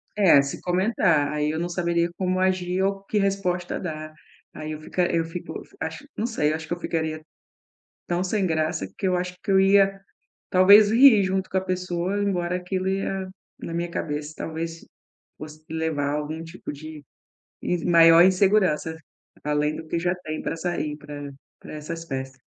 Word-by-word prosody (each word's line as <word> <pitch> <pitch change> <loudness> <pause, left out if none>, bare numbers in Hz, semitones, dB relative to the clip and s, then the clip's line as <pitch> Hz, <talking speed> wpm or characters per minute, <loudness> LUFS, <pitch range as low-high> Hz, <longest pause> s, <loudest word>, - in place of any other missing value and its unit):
É, 185 -9 +6
se 140 0 -5
comentar, 180 -5 +2
aí 150 0 0
eu 155 - -2
não 175 +1 -2
saberia 170 -1 0
como 185 -1 0
agir 185 -1 0
ou 195 0 -1
que 210 - -1
resposta 195 -3 -1
dar. 155 -3 -6 0.4
Aí 155 0 -6
eu 155 - -5
fica 180 +3 0
eu 165 -1 +1
fico 165 +2 -7 0.2
acho - - -5
não 220 - -1
sei, 155 -11 0
acho 160 0 -5
que 175 - -2
eu 175 - -6
ficaria 160 -2 -3 0.8
tão 175 +1 -1
sem 195 0 0
graça, 155 - -1
que - - -1
eu 185 -1 +2
acho 180 0 -3
que - - -4
eu 190 0 +5
ia 195 0 +4 0.5
talvez 200 +3 +7
rir 230 -4 +7
junto 190 0 -1
com 190 - -1
a 185 - +2
pessoa, 185 +1 -2
embora 180 -3 0
aquilo 185 +1 -3
ia, 195 0 -2 0.3
na 165 - -6
minha 170 +1 -2
cabeça, 150 -2 -4
talvez 165 +1 -5 0.5
fosse 155 +1 -10
levar 160 -3 -1
algum 150 +2 -3
tipo 165 +3 -8
de 155 +1 -10 0.6
in 175 -2 -1
maior 165 0 +8
insegurança, 185 -4 +2 0.5
além 150 0 0
do 160 - -8
que 170 - -1
já 175 +1 0
tem 155 -3 -6
pra - - -3
sair 165 -3 -3
pra 145 -1 -8 0.3
pra - - -11
essas 165 +2 -6
festas. 135 -3 -6
175 Hz, 175 wpm, -24 LUFS, 155-190 Hz, 0.8 s, maior